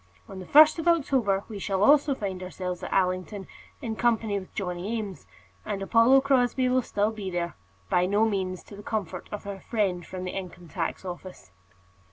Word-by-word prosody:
On 190 - -8
the 185 - -9
first 310 +2 +7
of 325 - -3
October 260 - +2
we 215 -3 -7
shall 195 0 0
also 285 +2 +5
find 195 -6 -4
ourselves 180 -1 -5
at - - -6
Allington 185 +1 0 0.4
in 225 -3 -3
company 220 -3 +1
with 185 - -12
Johnny 185 +4 -3
Eames; 205 -4 -6 0.4
and 205 -2 -3
Apollo 230 +7 +5
Crosbie 260 -1 +2
will 255 0 +3
still 210 -2 0
be 210 -3 -5
there, 175 -1 -3 0.3
by 180 - +2
no 205 +3 +3
means 190 -4 -2
to 205 - -12
the 205 - -10
comfort 195 -5 -4
of 210 - -6
our 200 -1 -5
friend 190 -5 -1
from 185 +2 -7
the 180 - -3
Income 180 -3 -7
tax 170 +2 -3
Office. 175 - -8
200 Hz, 190 wpm, -27 LUFS, 185-230 Hz, 0.4 s, first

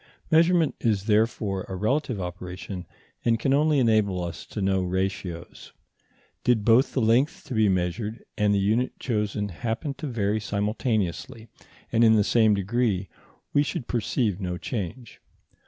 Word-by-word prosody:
Measurement 165 -1 +4
is 105 -4 +1
therefore 105 -3 +1
a 95 - -4
relative 125 +3 0
operation, 90 0 -6 0.4
and 115 -1 +2
can 135 +3 +1
only 150 +1 +3
enable 110 -7 +2
us 85 -1 -6
to - - -6
know 95 -1 +1
ratios. 90 -2 -4 0.7
Did 115 -4 +2
both 120 +4 +4
the 130 - +1
length 120 +7 +2
to 135 - -7
be 110 -3 +3
measured 95 +5 -2
and 105 -1 +2
the 100 - +3
unit 110 +6 0
chosen 105 -3 -1
happen 115 - -3
to 155 - -4
vary 110 -4 0
simultaneously 105 0 -2 0.4
and 115 - +3
in 110 -1 +6
the 105 - +4
same 110 -1 +4
degree, 100 -1 0 0.4
we 145 - +4
should 145 -3 -3
perceive 110 -3 -1
no 90 -1 -3
change. 115 +3 -6
110 Hz, 150 wpm, -26 LUFS, 95-120 Hz, 0.7 s, in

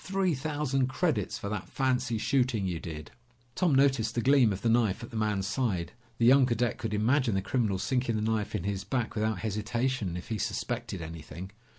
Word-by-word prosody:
Three 190 -2 +1
thousand 140 -2 0
credits 135 - 0
for - - -5
that 105 -3 -4
fancy 125 -3 0
shooting 125 -3 +1
you 90 -3 -2
did!" 75 -3 -7 0.4
Tom 170 -2 +2
noticed 135 -5 +3
the 120 - +1
gleam 130 -3 +5
of 95 0 -4
the - - +2
knife 115 -3 +2
at 120 - -8
the - - -9
man's 105 -3 0
side. 100 -6 -1 0.3
The 115 - +2
young 130 +1 +6
cadet 120 -1 0
could 110 -2 -2
imagine 120 +1 +2
the 95 - +1
criminal 105 -2 0
sinking 125 +2 0
the 105 - -1
knife 110 -2 -1
in - - -2
his 100 -1 -2
back 125 -1 -2
without 110 -1 0
hesitation, 110 -1 -1
if 90 - -9
he 110 -2 -2
suspected 115 -2 -3
anything. 80 +3 -8
115 Hz, 200 wpm, -29 LUFS, 100-130 Hz, 0.4 s, young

